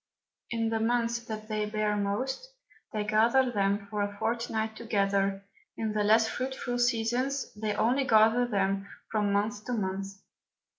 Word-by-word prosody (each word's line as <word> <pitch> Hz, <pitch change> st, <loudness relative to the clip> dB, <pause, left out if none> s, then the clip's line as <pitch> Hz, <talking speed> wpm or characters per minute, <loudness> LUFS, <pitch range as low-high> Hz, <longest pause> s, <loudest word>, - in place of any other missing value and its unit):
In 230 Hz, -1 st, 0 dB
the 225 Hz, 0 st, 0 dB
Months 235 Hz, +1 st, +1 dB
that 215 Hz, -1 st, -6 dB
they 215 Hz, -1 st, -1 dB
bear 210 Hz, 0 st, 0 dB
most, 255 Hz, -, -2 dB, 0.4 s
they 215 Hz, -1 st, -1 dB
gather 230 Hz, +4 st, +3 dB
them 200 Hz, -1 st, 0 dB
for 205 Hz, 0 st, -3 dB
a 205 Hz, 0 st, -2 dB
Fortnight 220 Hz, 0 st, -1 dB
together; 200 Hz, -3 st, 0 dB, 0.3 s
in 220 Hz, -1 st, -2 dB
the 210 Hz, -1 st, +1 dB
less 220 Hz, +2 st, +5 dB
fruitful 255 Hz, 0 st, -3 dB
Seasons, 245 Hz, +3 st, 0 dB
they 210 Hz, 0 st, -2 dB
only 245 Hz, +6 st, +2 dB
gather 225 Hz, +2 st, +5 dB
them 195 Hz, -2 st, 0 dB, 0.2 s
from 210 Hz, -2 st, +1 dB
Month 210 Hz, +1 st, 0 dB
to 250 Hz, -, -2 dB
Month. 195 Hz, -3 st, -2 dB
220 Hz, 150 wpm, -29 LUFS, 205-235 Hz, 0.4 s, less